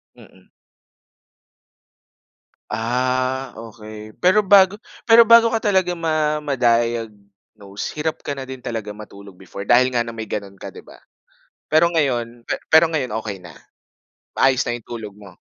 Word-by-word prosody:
Mm. - - -20 2.2
Ah, 130 +3 -1
okey. 110 -1 -11
Pero 200 +3 +3
bago 195 0 +5 0.3
pero 230 +1 +8
bago 230 0 +6
ka 225 - 0
talaga 190 -5 0
ma 155 -2 0
ma-diagnose, 115 -6 -3
hirap 155 +1 -3
ka 140 -1 -5
na 135 - -6
din 130 -1 -9
talaga 110 -4 -5
matulog 100 -2 -12
before, 95 +2 -10
dahil 125 +3 +4
nga 120 -2 -1
na 115 - -7
may 110 -2 -7
gano'n 100 -2 -5
ka, 100 - -9
'di 445 - -14
ba? - - -16 0.7
Pero 160 +2 +5
ngayon 120 -8 -2 0.2
pero 160 +1 +5
ngayon, 140 -5 -1 0.2
okey 100 -3 -6
na? 90 -4 -13 0.8
Maayos 135 -1 +3
na 120 - -1
'yong 120 - -14
tulog 110 -4 -8
mo? 100 -3 -14
125 Hz, 145 wpm, -20 LUFS, 110-155 Hz, 2.2 s, pero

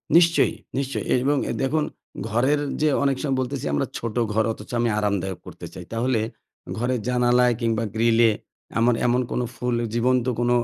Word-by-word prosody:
নিশ্চয়ই, 170 -1 +5 0.2
নিশ্চয়ই 135 0 -2
এর - - +4
এবং 145 +1 +3 0.2
দেখুন 150 +3 +1 0.5
ঘরের 130 +7 +2 0.2
যে 155 - +4
অনেক 140 -1 +2
সময় 135 -3 0
বলতেছি 130 - -3
আমরা 70 - +1
ছোট 115 -1 -4 0.2
ঘর 110 +1 +2
অথচ - - -12
আমি 120 -1 +2
আরামদায়ক 95 -3 -1
করতে - - -9
চাই। - - -8
তাহলে 120 +1 +1 0.6
ঘরের 125 +2 0
জানালায় 125 0 +4
কিংবা 115 -1 +1
গ্রিলে 115 0 +4 0.5
এমন, 120 +1 +4
এমন 125 +1 +3
কোন - - 0
ফুল 125 0 -1 0.2
জীবন্ত 125 +1 +2
কোন 120 0 +1
125 Hz, 165 wpm, -24 LUFS, 115-130 Hz, 0.6 s, নিশ্চয়ই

